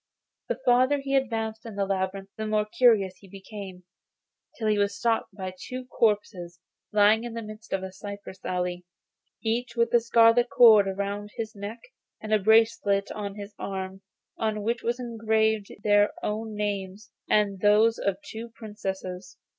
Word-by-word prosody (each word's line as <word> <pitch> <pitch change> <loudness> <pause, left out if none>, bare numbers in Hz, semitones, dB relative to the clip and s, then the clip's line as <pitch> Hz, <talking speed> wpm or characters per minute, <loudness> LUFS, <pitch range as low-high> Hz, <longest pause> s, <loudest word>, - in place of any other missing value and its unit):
The - - -2
farther 255 +3 +4
he 275 0 -2
advanced 225 -4 -1
in 225 -4 -8
the 200 -1 0
labyrinth 195 0 -3
the 220 0 -4
more 215 0 +1
curious 215 -4 +3
he 195 - -17
became, 195 -1 -9 0.7
till 220 - -2
he 210 -1 +2
was 200 0 0
stopped 225 0 0
by 185 -2 -5
two 255 +7 -7
corpses 205 -7 -1 0.3
lying 210 +2 +4
in 235 -1 -6
the 230 - -3
midst 215 +1 -11
of 190 -1 -1
a 190 - -6
cypress 200 -1 -9
alley, 180 0 -2 0.6
each 235 +2 -1
with 235 0 +1
a 240 - +7
scarlet 230 +1 +4
cord 220 -4 +7
round 200 +1 -3
his 220 -1 -4
neck 205 +2 -7 0.4
and 215 0 -3
a 215 - +5
bracelet 210 -1 +3
on 200 -2 -5
his 205 0 -8
arm 190 0 -5 0.4
on 215 -2 -1
which 235 +2 -1
were 235 - 0
engraved 220 -3 0
their 205 0 +4
own 215 +1 -3
names, 205 0 -4 0.2
and 205 -2 +2
those 215 +3 +4
of 200 -2 0
two 230 +1 -7
Princesses. 190 -4 -6
210 Hz, 160 wpm, -26 LUFS, 195-225 Hz, 0.7 s, a